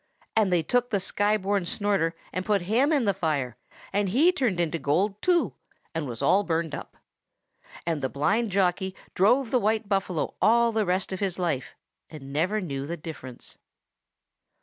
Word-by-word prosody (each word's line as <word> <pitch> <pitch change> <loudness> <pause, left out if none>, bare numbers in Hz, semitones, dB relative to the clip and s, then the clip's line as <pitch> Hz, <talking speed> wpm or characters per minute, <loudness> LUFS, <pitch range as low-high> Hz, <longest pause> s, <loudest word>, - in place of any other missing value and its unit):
And 215 -4 +3
they 175 -2 +3
took 245 +8 +1
the 205 -5 +1
Sky 205 +3 +1
born 200 -1 0
Snorter 185 -3 0 0.2
and 185 - -2
put 200 -2 +1
him 240 - +2
in 285 -6 +2
the 200 - +3
fire, 150 -10 -1 0.4
and 200 -1 +1
he 290 - +5
turned 250 - 0
into 170 -1 0
gold 195 +9 0
too, 355 -2 +2 0.4
and 160 -3 -2
was 115 -2 -5
all 200 - +5
burned 165 -4 -1
up. - - -7 0.9
And 165 -3 -1
the 130 - -1
blind 205 - +1
jockey 190 0 +1 0.2
drove 230 +6 +3
the 255 - +3
white 215 0 0
buffalo 195 -5 -1
all 235 +1 +4
the 220 -3 0
rest 185 +2 0
of 190 - -3
his 195 -3 -1
life, 170 -8 -2 0.3
and 140 -3 -10
never 180 +8 +1
knew 140 -7 -4
the 170 +2 -4
difference. 150 -6 -9
190 Hz, 175 wpm, -26 LUFS, 165-215 Hz, 0.9 s, he